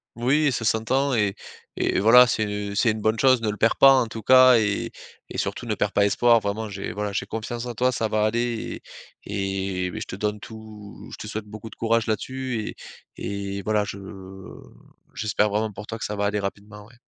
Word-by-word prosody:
Oui, 140 +5 +2
ça 115 -3 -3
s'entend 130 +6 +1
et 105 -4 +1 0.4
et - - +1
voilà, 125 +4 +8
c'est, 110 -2 0
heu, 105 0 -4
c'est 110 +2 +3
une 110 - -4
bonne 110 +1 +1
chose. 130 -3 +4
Ne 110 - -1
le 105 - -2
perds 115 - +2
pas, 135 0 +8
en 120 - -1
tout 110 -1 -8
cas 130 -1 +7
et 105 -2 -1 0.4
et - - -7
surtout, - - -3
ne - - -1
perds - - -1
pas 100 - +3
espoir. 115 +3 +4
Vraiment, 110 +1 -3
j'ai 100 -1 -6
voilà, 105 0 -3
j'ai - - -2
confiance 115 +2 -5
en 120 - -5
toi, 125 +3 +2
ça 115 -3 -1
va 105 0 0
aller 120 +1 -2 0.4
et 95 -2 -3
et 90 - -3
beh, - - -6
je - - -6
te - - -6
donne 105 +1 -2
tout 110 -1 -11
je - - -8
te - - -8
souhaite 110 0 -5
beaucoup 110 +2 -9
de - - -14
courage, 115 0 +1
là-dessus 125 +1 -3 0.4
et 100 -1 -5
et - - -4
voilà, 105 +1 +1
je 100 - -7 1.1
j'espère 105 -1 0
vraiment 105 +1 -1
pour 105 +2 -9
toi 115 - -6
que - - -6
ça 105 - -4
va 100 0 -1
aller 105 +1 0
rapidement, 105 +1 -7
ouais. 120 0 -21
110 Hz, 225 wpm, -24 LUFS, 105-115 Hz, 1.1 s, voilà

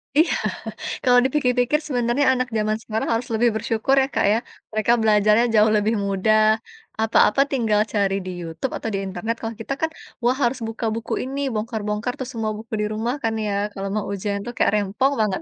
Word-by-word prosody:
Iya. 320 +4 +4 0.7
Kalau 245 -1 +6
dipikir-pikir 260 0 +2
sebenarnya 245 0 +1
anak 255 0 -1
jaman 215 0 0
sekarang 220 -1 -3
harus 230 +2 -1
lebih 235 +2 +3
bersyukur 225 +4 +1
ya 265 - +1
Kak - - +2
ya. - - +3 0.4
Mereka 215 +1 +1
belajarnya 215 +1 +4
jauh 215 0 +5
lebih 215 +2 +1
mudah, 200 +2 +2 0.6
apa-apa 225 +3 +4
tinggal 225 -6 +2
cari 200 -2 +1
di 185 - -4
YouTube 165 +10 -4
atau 225 - -4
di 195 - 0
internet. 220 +4 -3
Kalau 225 0 -4
kita 250 - -3
kan, 320 - +1 0.3
wah 245 +2 +3
harus 245 +2 +1
buka 225 +1 -4
buku 230 - -4
ini, 270 +2 -4
bongkar-bongkar 215 +1 -2
tuh 260 - -4
semua 220 -2 -2
buku 220 +1 -11
di - - +1
rumah 230 +4 -1
kan 225 -1 +1
ya, 205 - -1 0.2
kalau 195 0 -4
mau 215 - -1
ujian 200 +1 -2
itu 240 - -5
kayak - - +3
rempong 210 +7 +1
banget. 205 -3 0
225 Hz, 190 wpm, -22 LUFS, 210-245 Hz, 0.7 s, Kalau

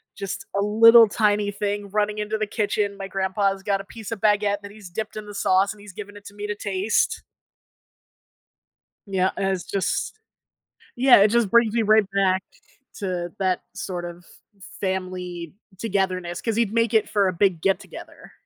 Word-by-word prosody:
Just 195 +3 -5
a 200 - +1
little 225 +2 +7
tiny 205 -1 +1
thing 205 0 -3
running 210 +1 -1
into 210 +1 -2
the 215 - -1
kitchen. 205 -1 -1
My 195 -1 -6
grandpa's 195 0 -1
got 200 -1 0
a - - -14
piece 220 +1 -9
of 220 -3 -5
baguette 205 -1 +2
that 200 0 -10
he's 205 -3 -12
dipped 215 +4 -5
in 215 - -6
the 205 - -9
sauce 195 0 +2
and 210 - -17
he's 205 -2 -12
given 205 +1 -9
it 205 - -15
to 200 - -11
me 205 0 -6
to 210 - -3
taste. 200 +1 0 1.8
Yeah, 190 -1 +1
it's 190 -2 -1
just 200 - -2 0.8
yeah, 255 +1 +7
it 205 +1 +5
just 235 -2 +2
brings 235 -2 +4
me 235 - +2
right 215 0 +4
back 190 -1 +2 0.6
to 180 -4 -3
that 185 -2 0
sort 175 -2 -5
of 175 0 -9 0.6
family 180 -3 -4 0.2
togetherness 185 -3 -2
'cause 225 -1 -1
he'd 225 -2 0
make 230 0 +1
it 220 - +3
for 200 -2 +2
a 185 - 0
big 180 -2 +1
get 195 +2 +2
together. - - -12
200 Hz, 180 wpm, -23 LUFS, 190-215 Hz, 1.8 s, little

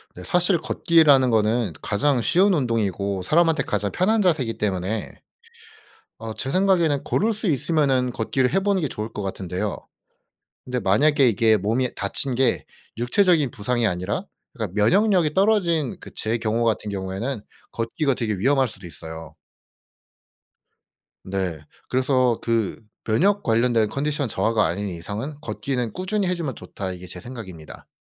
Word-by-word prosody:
네. 90 - -9
사실 180 - +2
걷기라는 145 -7 +4
거는 110 -3 +1
가장 130 +4 +1
쉬운 190 - +3
운동이고 100 - -1
사람한테 165 - +3
가장 105 -1 -1
편한 215 +5 +2
자세이기 150 - +1
때문에. 100 +1 -3 1.0
어 115 -1 -6
제 130 - -3
생각에는 175 -6 +2
걸을 225 +3 +1
수 215 0 -2
있으면은 140 -4 +1
걷기를 125 +5 0
해보는 195 -1 +1
게 150 - 0
좋을 110 -2 -6
것 105 - -5
같은데요. 95 +1 -3 0.9
근데 125 0 -3
만약에 130 +7 +3
이게 110 0 +3
몸이 115 +6 -1
다친 125 +6 +1
게 130 0 +1 0.3
육체적인 155 +3 +3
부상이 120 +3 0
아니라 90 - -2 0.3
그러니까 110 - -5
면역력이 180 - +3
떨어진 180 - +2
그 - - -11
제 110 +2 -1
경우 115 +1 -1
같은 110 -2 0
경우에는 100 +6 -4 0.3
걷기가 130 +5 -1
되게 110 -3 -2
위험할 135 +6 +2
수도 95 -4 -8
있어요. 80 -1 -8 1.9
네. 95 -5 -3 0.3
그래서 130 -2 +1
그 115 -2 -1 0.2
면역 195 - +2
관련된 115 -1 +2
컨디션 145 +1 -1
저하가 110 0 +1
아닌 100 +5 -2
이상은 105 - -5
'걷기는 130 -6 -3
꾸준히 190 +2 -1
해 180 - +1
주면 155 -8 -4
좋다.' 95 -2 -6
이게 90 0 -8
제 90 0 -7
생각입니다. 95 -8 -10
120 Hz, 330 characters per minute, -23 LUFS, 105-155 Hz, 1.9 s, 걷기라는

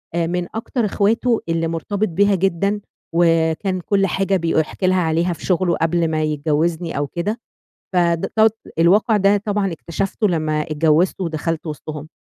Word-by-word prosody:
آآ 170 -1 +1
من 175 0 -2
أكتر 230 +1 -2
إخواته 225 +4 +1
اللي 165 0 0
مُرتبط 200 +6 -2
بيها 200 +4 +2
جدًا، 195 +3 0 0.3
وكان 165 +2 +2
كُلّ 195 +1 +1
حاجة 195 +1 0
بيق 165 -1 -1
بيحكي 160 +4 0
لها 185 0 +3
عليها 170 +2 +1
في - - -10
شُغله 180 -2 +1
قبل 165 +1 +1
ما 155 0 0
يتجوزني 155 +2 -1
أو 145 0 -1
كده، 190 - -3 0.6
فده 170 -2 +1 0.2
ت - - 0 0.3
الواقع 205 +6 +4
ده 200 +1 +4
طبعًا 200 -2 -1
اكتشفتُه 195 +6 -2
لمّا 155 -3 0
اتجوزت 155 +4 +1
ودخلت 165 -1 -2
وسطهُم. 150 0 -6
170 Hz, 155 wpm, -20 LUFS, 160-195 Hz, 0.6 s, الواقع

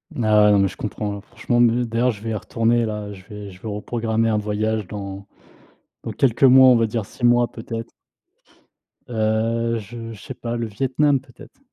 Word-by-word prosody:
Ah 105 -3 +4
non, 100 - +5
mais 100 0 +3
je - - -9
comprends, 105 -1 -4
franchement 120 +2 -2
me 120 +1 +3
d'ailleurs, 115 +2 +1
je 105 -2 -5
vais 115 - -3
y - - -1
retourner 115 +2 +1
là, 105 -2 -4
je 95 -1 -13
vais 105 -2 -9
je 90 0 -16
vais 110 - -7
reprogrammer 115 +1 -1
un 105 -1 +1
voyage 105 -1 -2
dans 100 -1 -7 0.8
dans - - -4
quelques 130 -1 +1
mois, 130 0 +8
on 125 - +7
va 115 -1 +3
dire 110 -1 -2
6 120 - -4
mois 120 -1 +4
peut-être. 115 0 -7 1.2
Heu, 115 +1 0
je 115 +3 -9
je 105 - -12
sais 130 - -8
pas, 120 -1 -5
le 115 -1 -2
Vietnam 135 +5 +1
peut-être. 135 - -17
115 Hz, 195 wpm, -22 LUFS, 105-120 Hz, 1.2 s, mois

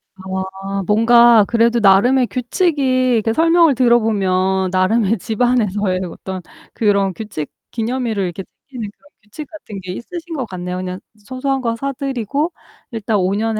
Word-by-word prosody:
아 190 +1 -5
뭔가 230 0 +6
그래도 235 0 +2
나름의 240 +6 +4
규칙이 255 -1 +1
이렇게 225 0 +1
설명을 330 0 +4
들어 240 -1 +4
보면 190 -3 0
나름의 205 +3 +2
집안에서의 210 -4 0
어떤 190 +2 -7 0.3
그런 200 -3 +1
규칙 185 -7 -6 0.2
기념일을 230 -3 -2
이렇게 180 +1 -4 0.3
챙기는 240 -6 -6
그런 290 - -24
규칙 220 +8 -9
같은 220 -11 -9
게 185 - -6
있으신 335 - -7
것 260 -4 -2
같네요. 180 -1 -5
그냥 185 0 -5 0.3
소소한 265 +2 -2
거 230 -2 -1
사 275 +4 -3
드리고 275 - -2 0.4
일단 220 -2 -1
오 190 +1 +1
년에 220 0 -1
225 Hz, 330 characters per minute, -18 LUFS, 195-255 Hz, 0.4 s, 뭔가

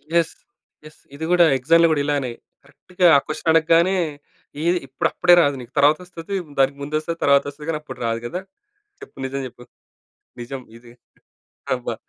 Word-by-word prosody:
Yes! 170 -2 +2 0.5
Yes! 155 - -15 0.2
ఇది 160 +3 -5
కూడా 175 -1 +6
ఎక్సామ్‌లో 165 +6 +4
కూడా 150 -2 +1
ఇలానే 140 -4 -1 0.3
కరెక్ట్‌గా 160 +6 -1
ఆ - - +4
క్వశ్చన్ 155 +1 -3
అడగగానే 165 +3 +4 0.7
ఇది 180 - +2
ఇప్పుడు 130 - -1
అప్పుడే 175 0 +4
రాదు 145 -3 +1
నీకు 125 +1 -13
తర్వాత 145 +2 +5
వస్తది, 180 +2 -7 0.2
దానికి 135 +1 +2
ముందు 145 +2 -4
వస్తది 165 +2 -5
తరువాత 140 0 +4
వస్తది 150 +2 -11
కానీ 160 - 0
అప్పుడు 150 - -10
రాదు 115 0 -1
గదా. 180 +10 -4 0.6
చెప్పు 420 - -14
నిజం 135 +1 -4
చెప్పు? 120 0 -15 0.8
నిజం 130 +2 -6 0.2
ఇది. 120 0 -17 0.8
అబ్బా! 120 -2 -4
150 Hz, 165 wpm, -21 LUFS, 135-165 Hz, 0.8 s, కూడా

